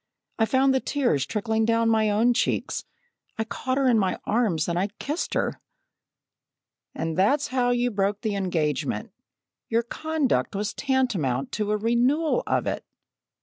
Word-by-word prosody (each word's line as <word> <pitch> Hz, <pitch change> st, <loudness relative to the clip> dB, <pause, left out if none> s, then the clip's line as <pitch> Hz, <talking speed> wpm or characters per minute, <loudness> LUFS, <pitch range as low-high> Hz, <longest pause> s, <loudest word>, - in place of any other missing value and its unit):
I 225 Hz, -, +4 dB
found 265 Hz, +2 st, +3 dB
the 265 Hz, -, +3 dB
tears 245 Hz, -, 0 dB
trickling 220 Hz, +1 st, 0 dB
down 230 Hz, 0 st, +2 dB
my 220 Hz, -1 st, +3 dB
own 225 Hz, +4 st, +3 dB
cheeks. 245 Hz, -, -1 dB, 0.5 s
I 220 Hz, -, 0 dB
caught 255 Hz, +3 st, -3 dB
her 275 Hz, -1 st, +2 dB
in 235 Hz, -3 st, +4 dB
my 190 Hz, -2 st, 0 dB
arms 205 Hz, -9 st, +1 dB
and 180 Hz, +4 st, -1 dB
kissed 300 Hz, +5 st, -3 dB
her." -, -, -1 dB, 1.3 s
"And 165 Hz, -1 st, -2 dB
that's 270 Hz, -, +2 dB
how 250 Hz, -1 st, +1 dB
you 245 Hz, 0 st, +1 dB
broke 200 Hz, 0 st, 0 dB
the 215 Hz, -, -1 dB
engagement. 165 Hz, -7 st, -1 dB, 0.6 s
Your 230 Hz, +1 st, +2 dB
conduct 310 Hz, -3 st, -1 dB
was 205 Hz, +1 st, -2 dB
tantamount 195 Hz, -, 0 dB
to 210 Hz, -1 st, -2 dB
a 210 Hz, -, +2 dB
renewal 250 Hz, -, +2 dB
of -, -, +1 dB
it!" -, -, -2 dB
225 Hz, 150 wpm, -25 LUFS, 200-255 Hz, 1.3 s, I